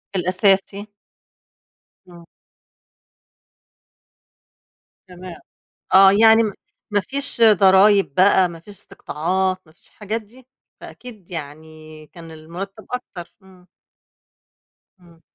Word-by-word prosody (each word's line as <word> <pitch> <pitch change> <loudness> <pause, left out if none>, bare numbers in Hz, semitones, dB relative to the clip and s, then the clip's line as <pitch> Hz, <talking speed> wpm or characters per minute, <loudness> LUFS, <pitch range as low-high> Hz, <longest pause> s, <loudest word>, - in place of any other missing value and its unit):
الأساسي. 195 +3 0 1.2
إمم. 170 -1 -16 2.8
تمام، 180 -1 -12 0.5
آه، 195 0 +7
يعني 225 +2 +4
م 210 -3 -4 0.4
ما 205 - +1
فيش 275 0 -4
ضرايب 195 -5 +4
بقى، 185 -1 +3
ما 165 -1 -12
فيش 205 +5 -15
استقطاعات، 185 +1 -4
ما 155 - -22
فيش 160 - -24
الحاجات 215 +2 -6
دي، 240 +4 -21 0.3
فأكيد 215 -8 -14
يعني 155 0 -11
كان 165 0 -14
المرتب 180 +7 -10
أكتر، 185 -9 -8
إمم. 185 -1 -21 1.3
إمم. 170 -2 -22
190 Hz, 95 wpm, -19 LUFS, 170-205 Hz, 2.8 s, آه